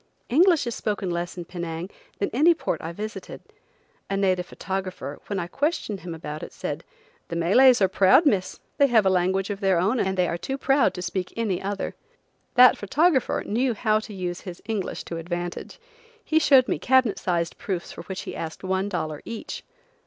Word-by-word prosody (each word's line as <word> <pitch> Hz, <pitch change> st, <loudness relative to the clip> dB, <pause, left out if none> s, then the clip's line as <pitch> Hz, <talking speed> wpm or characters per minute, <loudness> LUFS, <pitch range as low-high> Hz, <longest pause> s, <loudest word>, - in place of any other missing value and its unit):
English 335 Hz, +3 st, +4 dB
is 235 Hz, -, -2 dB
spoken 205 Hz, -5 st, -2 dB
less 175 Hz, +1 st, -3 dB
in 175 Hz, -, -5 dB
Penang 170 Hz, -1 st, -5 dB, 0.3 s
than 200 Hz, -, -1 dB
in 245 Hz, -, -4 dB
any 335 Hz, +3 st, +6 dB
port -, -, -3 dB
I 165 Hz, -, -5 dB
visited. 215 Hz, +5 st, -7 dB, 0.7 s
A 195 Hz, -, 0 dB
native 185 Hz, -2 st, +1 dB
photographer, 190 Hz, -8 st, -5 dB
when 200 Hz, -, -2 dB
I 175 Hz, -, -1 dB
questioned 275 Hz, -, -2 dB
him 175 Hz, -2 st, -7 dB
about 155 Hz, -1 st, -6 dB
it, -, -, -7 dB
said: -, -, -5 dB, 0.4 s
"The -, -, -5 dB
Malays 210 Hz, +8 st, +5 dB
are -, -, +6 dB
proud, 190 Hz, -, +5 dB
Miss. 195 Hz, -10 st, +1 dB, 0.2 s
They 280 Hz, -, +6 dB
have 225 Hz, -5 st, +4 dB
a 190 Hz, -, +4 dB
language 190 Hz, +2 st, +1 dB
of 200 Hz, -, -4 dB
their 195 Hz, -3 st, +2 dB
own 205 Hz, +8 st, +1 dB
and 190 Hz, -2 st, 0 dB
they 180 Hz, -1 st, +3 dB
are 170 Hz, -, -3 dB
too 265 Hz, +10 st, -3 dB
proud 270 Hz, -8 st, +2 dB
to 180 Hz, -, -5 dB
speak 180 Hz, +1 st, -3 dB
any 210 Hz, -6 st, -1 dB
other." 200 Hz, 0 st, -3 dB, 0.6 s
That 250 Hz, 0 st, +7 dB
photographer 270 Hz, -, +2 dB
knew 240 Hz, +2 st, 0 dB
how 215 Hz, 0 st, +2 dB
to 215 Hz, -, -9 dB
use 180 Hz, -2 st, -4 dB
his 180 Hz, -2 st, -8 dB
English 215 Hz, -4 st, -3 dB
to 170 Hz, -, -6 dB
advantage. 175 Hz, -, -5 dB, 0.5 s
He 315 Hz, -, +3 dB
showed 270 Hz, -5 st, +5 dB
me -, -, -1 dB
cabinet 260 Hz, -4 st, +3 dB
sized 170 Hz, -2 st, -1 dB
proofs 180 Hz, -4 st, -4 dB
for -, -, -8 dB
which 190 Hz, -1 st, -5 dB
he -, -, -7 dB
asked 160 Hz, +2 st, -6 dB
one 190 Hz, +1 st, -1 dB
dollar 155 Hz, -6 st, -3 dB
each. 230 Hz, -1 st, -6 dB
195 Hz, 195 wpm, -25 LUFS, 175-235 Hz, 0.7 s, That